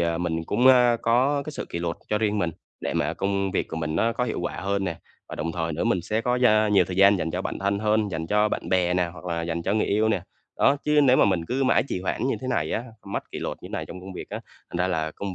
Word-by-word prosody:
ờ, 85 -1 0
mình 80 -2 -2
cũng, 125 +9 +1
a, 125 -2 +6
có 130 +5 +2
cái 155 - -5
sự - - -5
kỷ - - -4
luật 85 0 -2
cho 105 - +1
riêng 105 -1 0
mình 85 -4 0 0.3
để - - -3
mà - - 0
công 100 0 -1
việc 95 - -1
của - - -5
mình 80 -1 -2
nó 115 +6 +2
có 125 - -1
hiệu 115 - -3
quả 85 - -3
hơn 100 0 -1
nè. 85 -3 -3 0.3
Và - - -6
đồng 80 +2 -3
thời 80 0 -2
nữa 75 - -2
mình 90 - +2
sẽ 110 +5 -1
có 125 +2 0
gia 110 -4 +4
nhiều 100 -1 +4
thời 90 - -6
gian 100 +1 +6
dành 80 - -2
cho - - -3
bản - - -4
thân 100 +1 0
hơn, 105 0 +1
dành 80 -1 -3
cho 105 +3 +2
bạn - - -4
bè 90 -1 +2
nè, 90 -1 +2
hoặc 85 0 -12
là 85 -2 -2
dành 85 0 -3
cho 95 - 0
người 110 - +1
yêu 110 +2 +2
nè. 110 - +1 0.4
Đó, 140 - +4
chứ 150 0 +4
nếu 130 -2 +5
mà - - +5
mình 95 -4 +2
cứ 135 +6 0
mãi 130 - +4
trì - - -2
hoãn 95 +6 -2
như 135 - +1
thế 130 - -5
này 80 -11 0
á, 115 - -2 0.2
mất 100 - -5
kỷ - - -5
luật - - -5
như - - -8
này - - -4
trong 90 - -9
công 95 +1 -9
việc - - -8
á, - - -4 0.3
thành - - -5
ra 90 +1 +1
là 80 -3 -1
công 100 +3 -6
100 Hz, 305 wpm, -25 LUFS, 85-110 Hz, 0.4 s, a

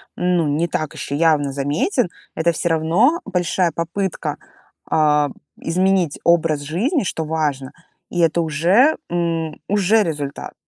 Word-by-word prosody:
ну, 180 -3 +1
не 155 +4 0
так 155 -1 -3
еще 140 - -5
явно 150 -3 +2
заметен, 160 - 0 0.3
это 170 +1 +2
всё 170 +1 -2
равно 170 - +2
большая 180 -2 0
попытка, 170 +4 -3 0.5
а, 150 -2 +3 0.3
изменить 185 -2 +1
образ 165 -3 +2
жизни, 200 - 0
что 165 -3 -3
важно, 150 -4 -2 0.4
и 175 - -3
это 170 0 +3
уже, 175 - +3
м, 165 -2 -2
уже 205 +2 +3
результат. 145 -4 -5
165 Hz, 130 wpm, -20 LUFS, 155-180 Hz, 0.5 s, а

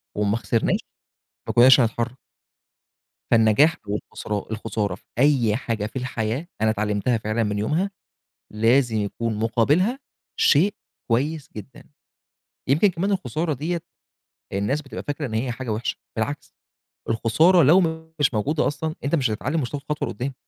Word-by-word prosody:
وما 105 +1 +1
خسرناش، 115 -1 0 0.7
ما - - 0
كنّاش 130 +2 +8
هنتحرك." 120 +2 -1 1.1
فالنجاح 115 +8 +5
والخسران 105 0 -4
الخسارة 110 -3 -2
في - - -22 0.2
أي 130 -6 +3
حاجة 115 -3 -2
في 105 - -8
الحياة، 125 +3 -2
أنا 110 - +3
اتعلمتها 110 +2 0
فعلًا 110 +1 -1
من 105 -1 -1
يومها، 160 - 0 0.6
لازم 115 +2 +3
يكون 110 +2 -2
مُقابلها 140 - +2 0.4
شيء 175 +8 +4 0.4
كويس 145 +6 0
جدًا. 120 +4 -10 0.8
يمكن 155 +10 +4
كمان 185 +2 -1
الخسارة 170 -4 -1
دِيّة 165 +6 -2 0.7
الناس 105 +10 -1
بتبقى 135 - -7
فاكرة 145 0 -3
إن 110 - -6
هي 120 +3 -1
حاجة 125 0 -6
وحشة، 110 +3 -2 0.2
بالعكس 140 +7 -3 0.6
الخسارة 155 +11 +4
لو 170 +8 +6 0.4
مش 145 -3 +3
موجودة 145 +8 +1
أصلًا 155 +2 -3
أنت 145 +4 +1
مش 130 -6 +1
هتتعلم 130 - -1
ومش 125 - -2
هتاخد 145 -1 -5
خطوة 150 - -1
لقدّام. 135 +3 -4
125 Hz, 140 wpm, -23 LUFS, 110-150 Hz, 1.1 s, كنّاش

